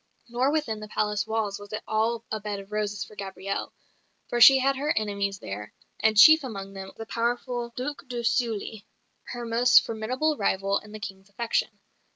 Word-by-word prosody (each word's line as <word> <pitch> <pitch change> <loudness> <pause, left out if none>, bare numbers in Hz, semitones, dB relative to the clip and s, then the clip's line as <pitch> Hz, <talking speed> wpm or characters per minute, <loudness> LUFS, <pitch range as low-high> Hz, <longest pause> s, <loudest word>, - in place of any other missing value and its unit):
Nor 250 +4 +1
within 295 -9 -1
the 215 - -8
palace 210 0 -1
walls 220 -3 -2
was 205 0 -12
it 215 - -4
all 225 +1 0
a 215 - -1
bed 205 -1 -4
of 195 +1 -12
roses 210 -2 -2
for - - -14
Gabrielle; 195 0 -5 0.6
for 240 - -1
she 270 +3 +10
had 270 +1 +2
her 290 +3 -1
enemies 200 -2 -1
there; 105 - -8 0.2
and 220 -1 +2
chief 315 +7 +9
among 195 -6 -6
them 190 0 -8
the 225 - -6
powerful 240 +1 -2
Duc 280 +2 -5
de 240 -2 -4
Sully, 225 -2 -1 0.4
her 240 -1 -6
most 240 +2 +5
formidable 255 +8 -1
rival 195 0 +1
in 210 - -15
the 215 - -8
King's 195 -1 -8
affection. 230 +3 -1
220 Hz, 185 wpm, -26 LUFS, 200-240 Hz, 0.6 s, she